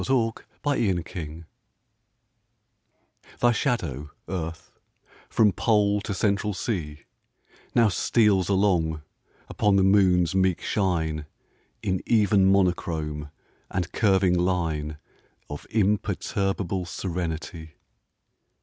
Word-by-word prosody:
AT - - -5
A - - +3
LUNAR 115 -3 -1
ECLIPSE 80 -1 -8 2.0
THY 120 - +4
shadow, 95 - -2 0.2
Earth, 85 -2 -5 0.6
from 105 -2 +4
Pole 105 0 +2
to 100 -1 -4
Central 100 +1 0
Sea, 80 - -3 0.7
Now 115 -2 +5
steals 100 -2 +2
along 90 -6 +1 0.4
upon 105 -1 +1
the 95 - +4
Moon's 95 -3 +4
meek 95 -2 +2
shine 80 -6 -1 0.6
In 95 -3 -1
even 100 -4 +4
monochrome 80 -6 0 0.4
and 90 -2 -3
curving 95 -4 +3
line 80 -4 -1 0.5
Of 75 - -7
imperturbable 95 -2 -1
serenity. 85 -3 -5
95 Hz, 95 wpm, -25 LUFS, 80-105 Hz, 2.0 s, Now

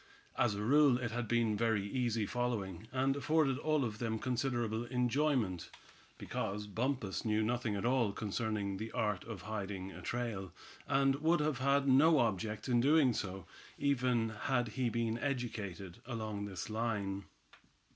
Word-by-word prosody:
As 110 -4 +2
a 105 - -3
rule 140 +1 +5
it 120 -3 -3
had 120 0 -2
been 115 -1 +2
very 105 -2 +1
easy 115 -2 0
following, 110 -5 -2
and 135 +1 +1
afforded 140 -2 +2
all 155 -3 +1
of 110 -2 -5
them 115 -2 -1
considerable 120 -2 -1
enjoyment, 125 - 0 0.5
because 105 +2 -3
Bumpus 110 0 -2
knew 110 -1 +1
nothing 120 -1 0
at 100 - -2
all 120 -4 +2
concerning 105 -1 -2
the 110 +3 -5
art 105 -6 0
of 110 -6 -7
hiding 100 -2 -4
a - - -10
trail, 115 -6 -3 0.3
and 135 0 +3
would 165 +4 +3
have 150 -3 0
had 140 +1 +2
no 150 +5 +6
object 110 -2 0
in 120 -2 +3
doing 140 -1 +5
so, 95 -3 -4 0.3
even 125 -5 +1
had 120 +2 -1
he 125 +1 -1
been 115 0 -1
educated 105 -10 -4
along 110 -4 -3
this 95 -3 -5
line. 105 -3 -2
115 Hz, 155 wpm, -34 LUFS, 105-130 Hz, 0.5 s, no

